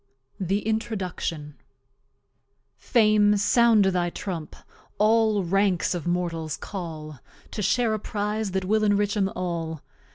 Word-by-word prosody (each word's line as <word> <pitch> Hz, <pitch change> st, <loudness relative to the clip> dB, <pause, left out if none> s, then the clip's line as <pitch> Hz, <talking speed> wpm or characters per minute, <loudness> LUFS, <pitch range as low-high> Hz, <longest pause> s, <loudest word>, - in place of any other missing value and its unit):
W. 190 Hz, -, -3 dB
THE 200 Hz, +3 st, -1 dB
INTRODUCTION 185 Hz, -9 st, -3 dB, 1.2 s
Fame 210 Hz, -3 st, +3 dB
Sound 220 Hz, +1 st, +4 dB
thy 180 Hz, -2 st, +1 dB
Trump, 170 Hz, -3 st, -6 dB, 0.4 s
all 215 Hz, -1 st, +3 dB
Ranks 190 Hz, 0 st, +1 dB
of 175 Hz, -1 st, -4 dB
Mortals 170 Hz, -3 st, -2 dB
Call, 155 Hz, -7 st, -7 dB, 0.3 s
To -, -, -4 dB
share 225 Hz, +3 st, +2 dB
a 215 Hz, -, -1 dB
Prize 210 Hz, 0 st, -2 dB
that 190 Hz, 0 st, -2 dB
will 215 Hz, +3 st, +2 dB
enrich 205 Hz, 0 st, +2 dB
'em 195 Hz, -2 st, +1 dB
All. 165 Hz, -3 st, -4 dB
195 Hz, 125 wpm, -25 LUFS, 175-215 Hz, 1.2 s, Sound